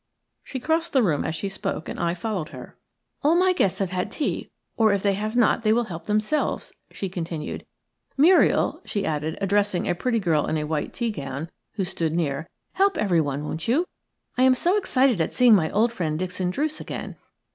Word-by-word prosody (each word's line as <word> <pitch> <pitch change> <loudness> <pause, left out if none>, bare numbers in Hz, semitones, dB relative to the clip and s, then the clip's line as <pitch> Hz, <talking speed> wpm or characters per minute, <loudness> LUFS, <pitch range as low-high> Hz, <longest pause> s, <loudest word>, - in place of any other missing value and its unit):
She 265 - -5
crossed 325 +5 0
the 265 -3 +4
room 155 -8 +1
as 160 - -2
she 200 - -3
spoke, 195 -4 -4
and - - -6
I 170 0 0
followed 185 -4 -3
her. - - -10 0.5
"All 300 +3 +4
my 365 +1 +4
guests 190 - +1
have 195 -2 -2
had 185 +3 -2
tea, 295 - -2 0.3
or 220 -2 +4
if 200 -1 0
they 200 -1 +3
have 215 +3 -3
not 240 -1 +3
they 215 -1 +2
will 240 +2 +3
help 175 -6 -8
themselves," 215 +8 0 0.2
she 195 - -4
continued. 165 -4 -5 0.5
"Muriel," 335 +7 +4
she 205 - -2
added, 155 0 -2
addressing 200 -1 +1
a - - +2
pretty 230 +7 0
girl 165 -7 +1
in 155 - 0
a 150 - -1
white 150 0 -2
tea 235 -2 -2
gown, 140 -2 -5 0.2
who 205 - -1
stood 165 -3 -2
near, 155 -1 -1 0.2
"help 395 +1 +2
everyone, 155 -8 +1
won't 160 +1 -4
you? 285 +10 +2 0.5
I - - +4
am 260 0 +6
so 350 +9 +2
excited 265 - +2
at 160 - -1
seeing 250 -2 +6
my 165 -6 +4
old 230 +3 +2
friend, 160 -8 -2
Dixon 185 +1 -2
Druce, 300 +10 -2
again. - - -6
200 Hz, 200 wpm, -24 LUFS, 165-240 Hz, 0.5 s, am